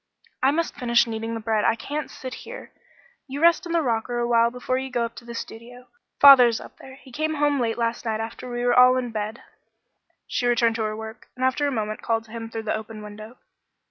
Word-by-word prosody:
"I 265 Hz, -, +4 dB
must 330 Hz, +3 st, 0 dB
finish 240 Hz, -3 st, +2 dB
kneading 225 Hz, 0 st, -4 dB
the -, -, -4 dB
bread; 220 Hz, -1 st, 0 dB
I 230 Hz, -, +3 dB
can't 290 Hz, +5 st, -5 dB
sit 255 Hz, -1 st, -8 dB
here. -, -, -10 dB, 0.6 s
You 275 Hz, +1 st, -5 dB
rest 335 Hz, +2 st, +4 dB
in -, -, -5 dB
the 335 Hz, -1 st, +2 dB
rocker 240 Hz, -1 st, -1 dB
awhile 235 Hz, -1 st, +3 dB
before 250 Hz, +1 st, -2 dB
you 265 Hz, 0 st, -5 dB
go 240 Hz, -2 st, 0 dB
up 230 Hz, -, -7 dB
to 235 Hz, -, -11 dB
the 235 Hz, 0 st, -8 dB
studio. 245 Hz, +2 st, -9 dB, 0.3 s
Father's 250 Hz, -5 st, +8 dB
up -, -, -13 dB
there. 265 Hz, 0 st, -12 dB
He 265 Hz, -1 st, -17 dB
came 310 Hz, +4 st, -2 dB
home 290 Hz, -1 st, +1 dB
late 230 Hz, -2 st, -1 dB
last 235 Hz, 0 st, -1 dB
night 220 Hz, -2 st, -2 dB
after 225 Hz, +3 st, -6 dB
we 240 Hz, 0 st, -3 dB
were 245 Hz, -, +3 dB
all 250 Hz, +1 st, +6 dB
in 245 Hz, -2 st, -3 dB
bed." 215 Hz, +2 st, -5 dB, 0.8 s
She 245 Hz, -, -1 dB
returned 235 Hz, -1 st, +2 dB
to 225 Hz, -, -1 dB
her 215 Hz, 0 st, -3 dB
work, 220 Hz, +1 st, -9 dB
and 255 Hz, +1 st, -1 dB
after 275 Hz, +3 st, +1 dB
a -, -, -1 dB
moment 215 Hz, -3 st, -3 dB
called 225 Hz, -1 st, 0 dB
to 220 Hz, -, -18 dB
him 225 Hz, -1 st, -6 dB
through 225 Hz, 0 st, -5 dB
the 215 Hz, -, -1 dB
open 220 Hz, 0 st, -7 dB
window. 215 Hz, +3 st, -10 dB
240 Hz, 235 wpm, -24 LUFS, 225-260 Hz, 0.8 s, Father's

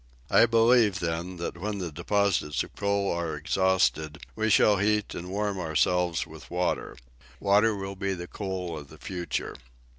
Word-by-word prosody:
I 115 Hz, -, +6 dB
believe, 115 Hz, -3 st, +4 dB
then, 85 Hz, +2 st, -3 dB
that 85 Hz, 0 st, -5 dB
when 105 Hz, +2 st, -3 dB
the 90 Hz, -4 st, -4 dB
deposits 85 Hz, -1 st, 0 dB
of -, -, -13 dB
coal 100 Hz, -1 st, 0 dB
are 85 Hz, -2 st, -2 dB
exhausted 80 Hz, -1 st, +1 dB, 0.2 s
we 110 Hz, 0 st, 0 dB
shall 105 Hz, 0 st, +5 dB
heat 105 Hz, +1 st, +1 dB
and 90 Hz, +1 st, -6 dB
warm 100 Hz, 0 st, -2 dB
ourselves 85 Hz, +1 st, +1 dB
with -, -, -13 dB
water. 90 Hz, 0 st, -2 dB, 0.4 s
Water 105 Hz, +2 st, +3 dB
will 95 Hz, 0 st, -5 dB
be 95 Hz, 0 st, -2 dB
the 85 Hz, -1 st, -6 dB
coal 95 Hz, -3 st, -4 dB
of 75 Hz, -2 st, -8 dB
the -, -, -13 dB
future." 90 Hz, -2 st, -4 dB
95 Hz, 160 wpm, -27 LUFS, 85-100 Hz, 0.4 s, I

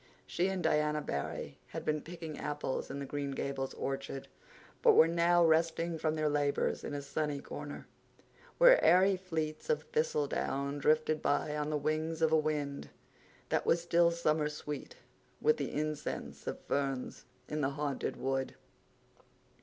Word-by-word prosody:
She 180 Hz, -, 0 dB
and 190 Hz, -2 st, -2 dB
Diana 150 Hz, 0 st, +2 dB
Barry 70 Hz, -, -4 dB
had -, -, -6 dB
been 150 Hz, -1 st, 0 dB
picking 165 Hz, -2 st, -7 dB
apples 145 Hz, -3 st, -3 dB
in 140 Hz, -, -5 dB
the 140 Hz, -, -4 dB
Green 140 Hz, 0 st, -3 dB
Gables 135 Hz, -1 st, -3 dB
orchard, 135 Hz, 0 st, -4 dB, 0.5 s
but -, -, +7 dB
were 160 Hz, -, +7 dB
now 170 Hz, +1 st, +4 dB
resting 165 Hz, +1 st, +2 dB
from 155 Hz, 0 st, 0 dB
their 155 Hz, -1 st, +1 dB
labors 145 Hz, -1 st, 0 dB
in 145 Hz, -, -4 dB
a 140 Hz, -, -4 dB
sunny 145 Hz, 0 st, -2 dB
corner, 145 Hz, +1 st, -7 dB, 0.7 s
where -, -, +7 dB
airy 190 Hz, +2 st, +6 dB
fleets 160 Hz, -, -4 dB
of 470 Hz, -, +1 dB
thistledown 445 Hz, -, 0 dB
drifted 155 Hz, +1 st, +2 dB
by 150 Hz, +1 st, +1 dB
on 150 Hz, 0 st, -1 dB
the 155 Hz, -, 0 dB
wings 155 Hz, +2 st, -1 dB
of 160 Hz, -, +4 dB
a -, -, +5 dB
wind 150 Hz, -2 st, -1 dB, 0.6 s
that -, -, 0 dB
was 170 Hz, -, +4 dB
still 170 Hz, 0 st, +4 dB
summer 155 Hz, -3 st, +1 dB
sweet 150 Hz, -, -6 dB, 0.4 s
with 460 Hz, 0 st, +3 dB
the -, -, -3 dB
incense 150 Hz, 0 st, -4 dB
of -, -, -3 dB
ferns 135 Hz, -2 st, -2 dB, 0.2 s
in 150 Hz, 0 st, -2 dB
the 135 Hz, -, +2 dB
Haunted 140 Hz, 0 st, -3 dB
Wood. 135 Hz, 0 st, -2 dB
155 Hz, 155 wpm, -33 LUFS, 145-165 Hz, 0.7 s, but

